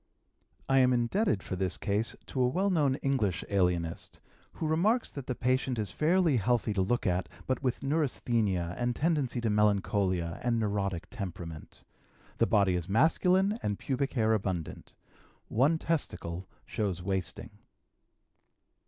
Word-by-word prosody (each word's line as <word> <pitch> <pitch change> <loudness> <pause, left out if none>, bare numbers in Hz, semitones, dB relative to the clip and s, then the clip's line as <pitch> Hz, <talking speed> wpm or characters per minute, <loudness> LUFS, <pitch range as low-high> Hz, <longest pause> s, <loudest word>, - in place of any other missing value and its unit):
I 135 0 +4
am 130 -1 +5
indebted 120 - +1
for - - -4
this 90 -1 -1
case 105 +3 -1
to 130 - -3
a 125 - +4
well 190 +10 +1
known 145 -6 +2
English 120 -10 0
alienist, 90 -4 -1 0.3
who - - -4
remarks 205 +10 +2
that 140 -3 -8
the 125 - -2
patient 130 0 0
is 105 -2 -2
fairly 165 -2 +3
healthy 115 0 +1
to 100 - +1
look 120 +7 0
at, 90 -1 0 0.2
but 130 - -1
with 125 0 -1
neurasthenia 115 - 0
and 120 0 0
tendency 145 -6 0
to 115 -2 0
melancholia, 100 -4 +1
and 120 -1 +1
neurotic 100 -5 -1
temperament. 85 -5 -7 0.6
The - - +4
body 100 -3 +3
is 90 0 -3
masculine 185 - +3
and 105 -1 -1
pubic 135 +1 -2
hair 110 -4 +2
abundant. 95 -6 -3 0.6
One 140 +8 +3
testicle 95 - -3 0.2
shows 95 -6 -2
wasting. 95 -3 -3
115 Hz, 145 wpm, -30 LUFS, 95-135 Hz, 0.6 s, am